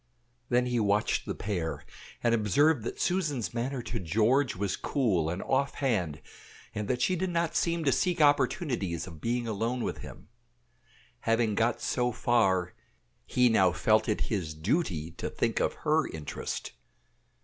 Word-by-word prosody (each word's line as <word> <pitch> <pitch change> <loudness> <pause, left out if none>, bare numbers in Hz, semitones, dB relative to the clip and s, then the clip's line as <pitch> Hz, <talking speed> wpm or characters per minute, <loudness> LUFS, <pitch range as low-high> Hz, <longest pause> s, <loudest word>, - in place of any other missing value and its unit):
Then 125 0 +3
he 125 -1 0
watched 105 -1 +1
the - - -2
pair, 90 -6 -3 0.4
and 120 - +3
observed 115 - +3
that - - -5
Susan's 155 - 0
manner 125 +2 -2
to 115 - -4
George 110 - +2
was 100 0 -1
cool 95 - 0
and 90 +3 -3
off 135 +1 0
hand, 90 - -1 0.5
and 105 -1 -3
that 125 -1 0
she 185 - +2
did 185 +1 -1
not 170 -1 -1
seem 170 -1 +1
to 140 - +3
seek 180 +5 +1
opportunities 130 - +1
of 80 -5 -11
being 120 0 -1
alone 115 +3 -1
with - - -3
him. - - -11 0.9
Having 115 -1 +1
got 115 +2 +1
so 125 -1 0
far, 95 -7 +2 0.5
he 125 0 +3
now 95 -6 +4
felt 110 +5 +2
it 105 - 0
his 85 -8 -2
duty 85 - -1
to 85 - -5
think - - -1
of - - +1
her - - +3
interest. 75 -2 -5
115 Hz, 160 wpm, -29 LUFS, 95-135 Hz, 0.9 s, now